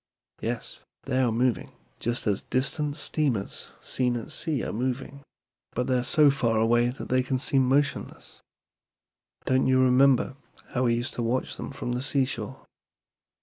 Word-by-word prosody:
"Yes, -, -, -4 dB, 0.2 s
they 130 Hz, -1 st, -1 dB
are 125 Hz, -3 st, +2 dB
moving, 120 Hz, +2 st, 0 dB, 0.3 s
just 120 Hz, +1 st, -1 dB
as 105 Hz, -3 st, +1 dB
distant 145 Hz, +3 st, 0 dB
steamers 135 Hz, -11 st, -1 dB
seen 125 Hz, -2 st, 0 dB
at 115 Hz, -, -7 dB
sea 155 Hz, -7 st, -1 dB
are -, -, -4 dB
moving; 130 Hz, +4 st, -3 dB, 0.5 s
but 125 Hz, -, -1 dB
they 130 Hz, -, 0 dB
are 125 Hz, -, +1 dB
so 150 Hz, +2 st, +5 dB
far 115 Hz, -5 st, 0 dB
away 120 Hz, +2 st, +3 dB
that 125 Hz, -, -7 dB
they 130 Hz, 0 st, +3 dB
seem 130 Hz, 0 st, +1 dB
motionless. 140 Hz, 0 st, -1 dB, 1.0 s
Don't 130 Hz, 0 st, +2 dB
you 130 Hz, 0 st, +4 dB
remember 130 Hz, 0 st, +4 dB, 0.3 s
how 130 Hz, 0 st, 0 dB
we 120 Hz, -1 st, +3 dB
used 120 Hz, +2 st, -3 dB
to -, -, -3 dB
watch 120 Hz, +3 st, -1 dB
them -, -, -6 dB
from 135 Hz, -3 st, -5 dB
the 125 Hz, +1 st, -1 dB
seashore. 130 Hz, -5 st, -1 dB
130 Hz, 155 wpm, -26 LUFS, 120-135 Hz, 1.0 s, so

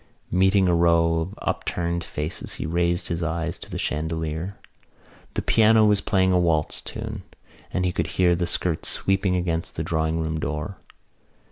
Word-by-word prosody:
Meeting 95 Hz, +1 st, +4 dB
a 90 Hz, -, +3 dB
row 85 Hz, -1 st, +3 dB
of 85 Hz, +5 st, -4 dB
upturned 85 Hz, 0 st, -1 dB
faces 75 Hz, +2 st, -5 dB
he -, -, -4 dB
raised 85 Hz, +2 st, 0 dB
his 85 Hz, 0 st, -2 dB
eyes 85 Hz, +1 st, -2 dB
to -, -, -10 dB
the -, -, -4 dB
chandelier. 80 Hz, +4 st, -2 dB, 0.8 s
The -, -, -1 dB
piano 110 Hz, 0 st, +5 dB
was 105 Hz, -1 st, +3 dB
playing 95 Hz, -3 st, +2 dB
a 90 Hz, -, +4 dB
waltz 80 Hz, -3 st, +1 dB
tune -, -, -6 dB, 0.5 s
and 90 Hz, -, 0 dB
he 90 Hz, -, +1 dB
could -, -, -1 dB
hear 90 Hz, -1 st, +4 dB
the 85 Hz, 0 st, -1 dB
skirts 85 Hz, -1 st, -1 dB
sweeping 95 Hz, -1 st, +1 dB
against 85 Hz, -2 st, -2 dB
the -, -, -2 dB
drawing 80 Hz, 0 st, 0 dB
room 80 Hz, -1 st, -2 dB
door. 75 Hz, +7 st, -4 dB
85 Hz, 165 wpm, -24 LUFS, 80-95 Hz, 0.8 s, piano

